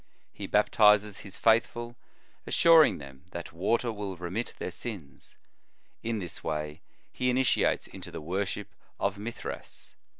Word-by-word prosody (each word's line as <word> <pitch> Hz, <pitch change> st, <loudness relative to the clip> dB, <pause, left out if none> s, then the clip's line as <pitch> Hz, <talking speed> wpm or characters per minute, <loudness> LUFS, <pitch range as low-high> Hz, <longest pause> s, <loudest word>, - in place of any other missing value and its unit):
He -, -, -6 dB
baptizes 105 Hz, -1 st, +4 dB
his 100 Hz, -, -10 dB
faithful, 120 Hz, +1 st, +2 dB, 0.5 s
assuring 165 Hz, -2 st, +6 dB
them 70 Hz, -1 st, -11 dB
that 85 Hz, -2 st, -6 dB
water 115 Hz, +7 st, +1 dB
will 100 Hz, -4 st, -5 dB
remit 90 Hz, +7 st, -4 dB
their -, -, -4 dB
sins; 100 Hz, -, -8 dB, 0.6 s
in 115 Hz, 0 st, -1 dB
this 90 Hz, -5 st, -7 dB
way 75 Hz, -1 st, -3 dB, 0.3 s
he 125 Hz, -, 0 dB
initiates 130 Hz, 0 st, +2 dB
into -, -, -10 dB
the -, -, -6 dB
worship 100 Hz, +5 st, -3 dB, 0.3 s
of 100 Hz, 0 st, 0 dB
Mithras. 115 Hz, +3 st, -7 dB
105 Hz, 130 wpm, -29 LUFS, 85-115 Hz, 0.6 s, assuring